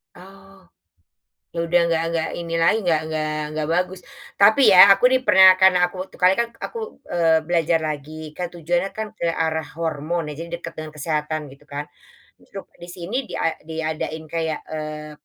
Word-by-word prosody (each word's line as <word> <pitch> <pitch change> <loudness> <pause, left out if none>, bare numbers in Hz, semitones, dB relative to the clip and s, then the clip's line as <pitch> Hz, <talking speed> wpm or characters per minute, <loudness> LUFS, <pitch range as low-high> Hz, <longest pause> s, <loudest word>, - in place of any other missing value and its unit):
Oh, 195 +1 -16 0.9
ya - - -9
udah 175 +1 +3
nggak 165 -1 +1
nggak 165 -1 -1
ini 170 -1 -6
lagi 170 +6 +4
nggak 165 -5 +1
nggak 155 -1 -2 0.2
nggak 155 -1 -2
bagus 180 +2 -1 0.4
tapi 220 +7 +6
ya 185 +2 +10
aku 195 +4 +5
di 260 - +3
pernah 190 -5 +7
kan 190 0 +7
aku 175 - -9
waktu 190 - -10
kali 185 0 +4
kan 235 - +1 0.2
aku, - - -8 0.4
eee, 165 -2 +2
belajar 165 -1 +1
lagi 155 +1 -7
kan 180 -1 -3
tujuannya 175 +2 -2
kan 220 0 -3
ke 220 - -5
arah 160 -1 -1
hormon 165 +1 -2
ya - - -6
jadi 170 0 -7
dekat 165 -1 -9
dengan 155 0 -6
kesehatan 155 0 -2
gitu 140 +2 -21
kan, 145 0 -5 1.0
di 175 - -9
sini 190 +10 -4
dia 160 -1 -2
diadain 160 0 -4
kayak, 160 -2 -2
eee, 155 -1 -6
165 Hz, 175 wpm, -22 LUFS, 155-185 Hz, 1.0 s, ya